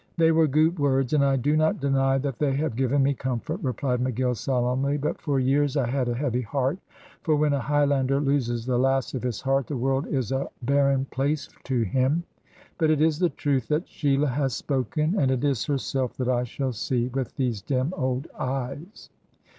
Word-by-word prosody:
"They 165 -1 +5
were 160 -1 +4
goot 155 +4 +2
words, 135 -1 +1
and 145 -2 +4
I 135 -1 +3
do 140 +4 +1
not 155 +1 +2
deny 135 -1 +2
that 135 -2 -3
they 140 -3 +1
have 145 -4 -1
given 135 +2 +2
me 140 +1 +2
comfort," 130 - -3
replied 130 -3 -1
McGill, 125 0 0
solemnly. 130 +4 0
"But 145 +1 -3
for 140 -2 0
years 140 +2 +2
I 135 - +2
had 130 0 0
a 120 - -1
heavy 125 -2 -1
heart; 135 - -1 0.4
for 155 - +2
when 150 0 +2
a 140 - +1
Highlander 140 -1 +1
loses 130 -5 0
the 125 -1 +1
lass 135 0 +1
of 130 - -3
his 125 -4 -3
heart, 135 -1 +1
the 145 - -3
world 135 +4 0
is 130 -6 -2
a 135 +1 -1
barren 140 0 +2
place 140 +3 -2 0.2
to 125 -4 +1
him. 130 - +1 0.6
But 160 -2 +3
it 155 -2 +3
is 155 0 +2
the 180 -2 +3
truth 135 -7 -1
that 155 +3 0
Sheila 140 0 +1
has 135 -1 -1
spoken, 150 +4 -1
and 135 - +2
it 130 0 0
is 140 -5 +1
herself 135 -3 -2
that 130 -1 -1
I 125 -1 +1
shall 130 +2 -3
see, 120 +2 -1
with 130 -2 -4
these 125 -7 -1
dim 130 - -1
old 130 -3 -1
eyes." 135 - -5
135 Hz, 200 wpm, -25 LUFS, 130-145 Hz, 0.6 s, They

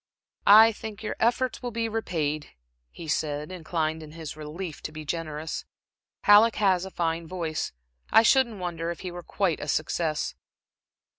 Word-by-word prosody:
"I 220 +2 +9
think 220 0 -8
your 215 - -3
efforts 245 +1 +1
will 245 - -3
be 230 0 -1
repaid," 160 -9 -2 0.3
he 165 - -10
said, 150 +1 -1
inclined 160 -2 -2
in 155 -1 -11
his 160 -2 -7
relief 155 +2 -6
to - - -5
be 155 0 -8
generous. 155 0 -4 0.6
"Halleck 210 +2 +7
has 190 -3 +2
a - - -6
fine 165 -2 -2
voice. 165 -3 -3 0.4
I 225 - +7
shouldn't 235 -2 +4
wonder 170 -2 -3
if 170 - -5
he 185 - -5
were 175 0 -7
quite 180 -2 -1
a - - -5
success." 155 -1 -1
170 Hz, 160 wpm, -27 LUFS, 155-210 Hz, 0.6 s, I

